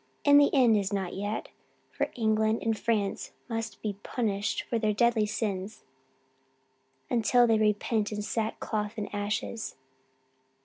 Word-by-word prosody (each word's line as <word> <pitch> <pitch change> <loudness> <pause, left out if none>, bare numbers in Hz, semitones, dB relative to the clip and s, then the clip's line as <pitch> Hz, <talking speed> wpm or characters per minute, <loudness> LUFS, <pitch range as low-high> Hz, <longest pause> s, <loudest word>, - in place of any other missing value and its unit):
And 285 0 +8
the 285 - +5
end 245 -5 +5
is 200 -1 -1
not 195 -3 -2
yet, 205 +2 -3 0.4
for - - -1
England 220 -1 +1
and 225 -1 +1
France 210 -2 -1
must 225 -2 -5
be 205 -2 -3
punished 205 -4 -1
for 230 - -2
their 215 -1 +1
deadly 230 -1 +3
sins 205 -1 -3 1.2
until 240 0 +4
they 225 -2 +3
repent 210 0 +1
in 210 0 -3
sackcloth 215 -1 -2
and 205 -1 -5
ashes.' 205 +2 -3
215 Hz, 135 wpm, -28 LUFS, 205-230 Hz, 1.2 s, And